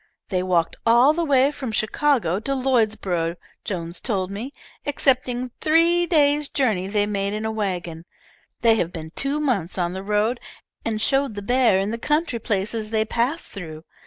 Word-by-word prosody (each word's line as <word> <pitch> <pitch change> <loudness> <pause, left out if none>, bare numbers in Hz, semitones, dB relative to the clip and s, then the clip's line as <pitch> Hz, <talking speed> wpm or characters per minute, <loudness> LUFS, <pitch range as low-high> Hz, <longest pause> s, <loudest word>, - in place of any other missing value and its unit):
They 185 -2 0
walked 175 -3 0
all 240 +5 +5
the 340 +1 -1
way 275 -2 +3
from 265 -5 -5
Chicago 215 - +1
to 275 +5 -2
Lloydsborough, 215 -10 0 0.3
Jones 170 -4 -4
told 195 -6 -1
me, 225 +7 -5 0.3
excepting 255 -3 0
three 335 +2 +3
days' 295 -3 +3
journey 215 -9 0
they 205 +1 +1
made 200 -1 -2
in 215 +1 -3
a 220 - -1
wagon. 175 -6 -3 0.6
They 225 -1 +5
have 170 -5 -1
been 160 -3 -7
two 275 - -1
months 220 - -1
on 175 -1 -1
the 190 - -5
road, 210 +4 0 0.4
and 220 -1 -2
showed 270 +1 +1
the 205 - -5
bear 245 -3 +3
in 195 +2 -1
the 230 - -4
country 300 -2 0
places 215 +1 -2
they 220 -1 +1
passed 245 +9 -1
through. 160 -5 -8
220 Hz, 170 wpm, -23 LUFS, 190-270 Hz, 0.6 s, all